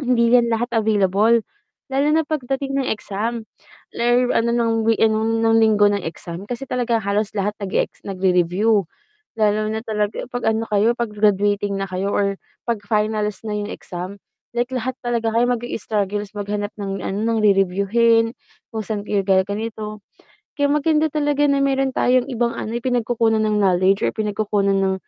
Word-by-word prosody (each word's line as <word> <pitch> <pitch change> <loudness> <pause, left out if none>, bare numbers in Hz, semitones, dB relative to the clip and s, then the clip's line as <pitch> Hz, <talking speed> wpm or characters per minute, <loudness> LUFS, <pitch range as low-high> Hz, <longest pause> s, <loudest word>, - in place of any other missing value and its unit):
hindi 235 -2 +3
'yan 240 -1 +5
lahat 235 +2 0
available. 215 +1 +3 0.5
Lalo 275 +2 +1
na 320 - +4
pagdating 275 -2 -2
ng 270 -1 0
exam. 220 +2 -4 0.5
Lalo 245 +1 +2
ano, 235 +1 +2
ng 235 -1 +1
wee 225 0 +2
ano, 220 0 +3
ng 225 0 +2
linggo 215 -2 +5
ng 205 -2 -1
exam 170 +2 -7
kasi 245 +4 -6
talaga 240 -2 0
halos 210 +1 -1
lahat 205 0 -2
nag-e-ex 200 -2 -3
nag-re-review. 190 +2 +2 0.5
Lalo 215 -1 +1
na 220 +1 -3
talaga 210 -2 -2
'pag 245 -2 -2
ano 220 0 +1
kayo, 215 +3 +3
'pag 235 -3 -3
graduating 205 -1 +1
na 195 -1 -4
kayo 185 +2 -2
or 200 -1 0 0.2
'pag 235 -3 -1
finals 210 -1 -1
na 215 - -4
'yong 210 0 -2
exam. 185 -1 -7 0.4
Like 240 +2 -1
lahat 255 0 -2
talaga 235 -2 0
kayo 235 - +4
mag-i-struggle 210 -4 -2
maghanap 205 0 -3
ng 195 -1 -4
ano, 195 - -3 0.2
ng - - +1
re-reviewhin, 210 +4 +3 0.4
kung 220 -2 -3
saan 210 -2 -3
kayo 205 -1 0
gaganito. 210 +3 -1 0.6
Kaya 285 -1 +1
maganda 305 +1 +2
talaga 290 -1 +1
na 280 - +2
mayro'n 270 -1 +1
tayong 255 +2 +2
ibang, 235 0 0
ano, 220 - -4
eh, - - -13
pinagkukunan 230 -3 +1
ng 210 -1 +1
knowledge 190 0 +3
or - - -2
pinagkukunan 210 -2 0
ng 190 0 +1
220 Hz, 165 wpm, -21 LUFS, 205-235 Hz, 0.6 s, yan